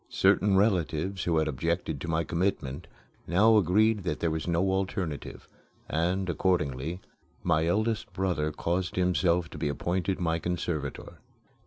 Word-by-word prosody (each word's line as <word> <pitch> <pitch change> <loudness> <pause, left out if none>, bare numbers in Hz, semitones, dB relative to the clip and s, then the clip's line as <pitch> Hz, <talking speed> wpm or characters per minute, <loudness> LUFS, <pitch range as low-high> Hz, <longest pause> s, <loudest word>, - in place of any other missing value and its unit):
Certain 95 0 +3
relatives 95 -2 +1
who 85 -2 +2
had 80 0 +2
objected 80 +1 -2
to - - -5
my 80 0 +1
commitment 85 -3 -2 0.4
now 105 +7 +5
agreed 105 +3 +3
that 80 -5 -3
there 85 - 0
was 80 +1 -3
no 90 +3 +1
alternative, 95 -5 -3 0.4
and, 90 +4 0
accordingly, 85 -3 0 0.4
my 80 -1 +2
eldest 110 +5 0
brother 85 -5 -1
caused 85 +4 -2
himself 90 -1 +2
to 75 - -10
be 75 -1 0
appointed 90 +6 -1
my 85 -2 0
conservator. 80 -5 -4
85 Hz, 140 wpm, -28 LUFS, 80-95 Hz, 0.4 s, now